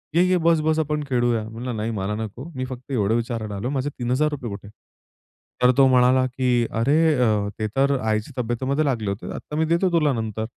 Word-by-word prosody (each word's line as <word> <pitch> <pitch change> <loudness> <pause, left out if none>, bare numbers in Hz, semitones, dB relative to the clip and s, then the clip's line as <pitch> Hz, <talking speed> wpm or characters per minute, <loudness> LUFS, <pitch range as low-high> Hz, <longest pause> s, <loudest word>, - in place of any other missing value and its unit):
ये-ये, 180 +1 +4
बस-बस 160 -1 +3
आपण 150 -1 -1
खेळूया." 120 -3 +1
म्हणलं, 120 +2 -5
नाही 110 +2 -2
मला 100 -1 -2
नको. 110 +3 -6
मी 130 - -3
फक्त 130 +1 -9
एवढं 110 -4 +1
विचारायला 115 -3 -3
आलो. 105 +6 -3
माझे 140 0 -1
3000 130 0 -1
कुठे? 100 0 -8 1.0
तर 125 - +7
तो 135 -1 +7
म्हणाला, 130 0 +4
की 125 -2 +1
"अरे 140 +6 +3 0.2
अ, 105 -5 +1
ते 110 - 0
तर 140 +1 +3
आईच्या 110 +4 -2
तब्येतीमध्ये 130 +6 -1
लागले 115 -7 -1
होते. 100 +2 -5
आता 150 - -7
मी 160 - +2
देतो 170 +4 +2
तुला 155 -4 +2
नंतर." 110 -2 -3
125 Hz, 185 wpm, -23 LUFS, 110-140 Hz, 1.0 s, तर